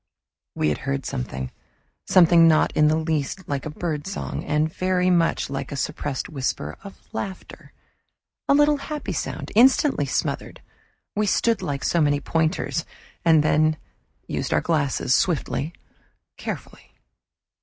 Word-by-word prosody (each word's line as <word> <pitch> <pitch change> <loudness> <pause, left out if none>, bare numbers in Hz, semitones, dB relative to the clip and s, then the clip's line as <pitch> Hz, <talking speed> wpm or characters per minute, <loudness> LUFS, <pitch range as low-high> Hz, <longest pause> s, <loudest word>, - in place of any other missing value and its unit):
We 75 - +1
had 75 - -1
heard 140 -1 -3
something: 65 +1 -4 0.6
something 170 -2 +6
not 155 -1 +3
in 150 0 +5
the 155 - +3
least 160 +3 -2
like 140 0 -3
a - - -4
birdsong, 160 +3 -4
and 155 +2 0
very 185 0 +1
much 170 -2 +2
like 135 +1 -5
a - - -3
suppressed 135 0 -3
whisper 130 - -3
of 200 - -11
laughter 190 -1 -7 0.8
a 280 - +6
little 295 0 +4
happy 280 -7 -5
sound, 150 -2 -4
instantly 255 - +4
smothered. - - -2 0.6
We 210 0 +1
stood 230 +2 +2
like 140 -2 -3
so 170 - +2
many 145 -1 +3
pointers, 165 +2 -1 0.4
and 160 -3 +5
then 155 0 +3 0.5
used - - -2
our - - +4
glasses, 145 -6 +1
swiftly, 160 -2 0 0.6
carefully. - - -8
155 Hz, 135 wpm, -24 LUFS, 145-185 Hz, 0.8 s, something